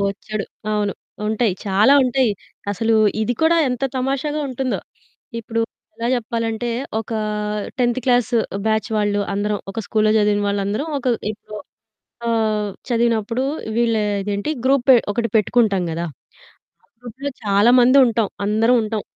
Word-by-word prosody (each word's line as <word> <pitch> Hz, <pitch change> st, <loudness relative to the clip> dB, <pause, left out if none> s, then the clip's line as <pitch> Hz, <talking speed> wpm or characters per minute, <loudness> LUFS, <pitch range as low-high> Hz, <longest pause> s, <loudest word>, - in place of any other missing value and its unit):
బొచ్చడు. 200 Hz, +1 st, -3 dB, 0.3 s
అవును. 205 Hz, -1 st, 0 dB, 0.3 s
ఉంటాయి. 220 Hz, -1 st, +1 dB
చాలా 205 Hz, +7 st, +4 dB
ఉంటాయి. 255 Hz, -1 st, +2 dB, 0.4 s
అసలు 225 Hz, +3 st, +1 dB, 0.3 s
ఇది 220 Hz, -, 0 dB
కూడా 330 Hz, +1 st, +4 dB
ఎంత 250 Hz, 0 st, -3 dB, 0.2 s
తమాషాగా 275 Hz, +3 st, -1 dB
ఉంటుందో. 260 Hz, 0 st, -2 dB, 0.6 s
ఇప్పుడు 230 Hz, 0 st, -3 dB, 0.3 s
ఎలా 230 Hz, +1 st, -3 dB
చెప్పాలంటే, 230 Hz, 0 st, -2 dB, 0.3 s
ఒక 225 Hz, -, -8 dB, 0.7 s
10త్ 240 Hz, 0 st, +1 dB
క్లాసు 245 Hz, -2 st, +2 dB, 0.3 s
బ్యాచ్ 220 Hz, +1 st, +1 dB
వాళ్ళు 205 Hz, -1 st, +1 dB
అందరం 205 Hz, 0 st, -1 dB
ఒక 210 Hz, -, -4 dB
స్కూల్లో 215 Hz, -1 st, +2 dB
చదివిన 205 Hz, -1 st, +2 dB
వాళ్ళందరం. 200 Hz, +8 st, -1 dB
ఒక 260 Hz, -, -8 dB, 0.3 s
ఇప్పుడు 210 Hz, 0 st, -11 dB, 0.7 s
ఆహ్, 215 Hz, -2 st, +1 dB, 0.2 s
చదివినప్పుడు 235 Hz, 0 st, +1 dB, 0.3 s
వీళ్ళు 230 Hz, -2 st, +2 dB, 0.2 s
ఇదేంటి, 205 Hz, +6 st, -2 dB
గ్రూపే 265 Hz, -1 st, +5 dB
ఒకటి 230 Hz, +2 st, -1 dB
పెట్టుకుంటాం 215 Hz, -3 st, +2 dB
కదా! 165 Hz, +1 st, -3 dB, 0.8 s
ఆ -, -, -31 dB
గ్రూప్‌లో 255 Hz, +4 st, -6 dB
చాలామంది 240 Hz, +6 st, +5 dB
ఉంటాం. 225 Hz, -3 st, +1 dB, 0.2 s
అందరం 225 Hz, +4 st, +3 dB
ఉంటాం. 215 Hz, -1 st, -3 dB
225 Hz, 125 wpm, -20 LUFS, 210-245 Hz, 0.8 s, గ్రూపే